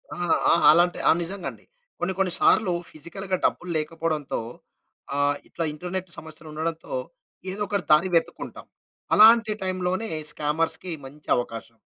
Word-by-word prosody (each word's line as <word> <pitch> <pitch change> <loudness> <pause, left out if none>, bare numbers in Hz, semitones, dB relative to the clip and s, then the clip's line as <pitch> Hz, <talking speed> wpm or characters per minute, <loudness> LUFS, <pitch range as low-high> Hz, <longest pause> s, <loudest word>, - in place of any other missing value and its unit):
ఆ! - - -10 0.3
ఆహ్, 170 - +3
అలాంటి 175 +2 +3
ఆ! - - +8
నిజంగా 190 +2 -5
అండి. - - -18 0.3
కొన్ని, 180 +2 -1
కొన్ని 190 -2 +2
సార్లు 195 -5 +4 0.2
ఫిజికల్‌గా 185 +5 -5
డబ్బులు 175 0 -1
లేకపోవడంతో, 155 -1 -2 0.8
ఆహ్, 145 0 +2
ఇట్లా 165 - -3
ఇంటర్నెట్ 180 +3 -5
సమస్యలు 155 0 -12
ఉండడంతో, 165 - -4 0.6
ఏదో 205 +2 -6
ఒకటి 200 -2 -2
దారి 155 +5 +5
వెతుక్కుంటాం. 165 - -2 0.5
అలాంటి 225 0 +7
టైమ్ 185 -1 -2
లోనే 220 +5 -2 0.2
స్కామర్స్‌కి 160 +3 -1
మంచి 150 +3 -13
అవకాశం. 115 -1 -6
170 Hz, 135 wpm, -25 LUFS, 155-185 Hz, 0.8 s, ఆ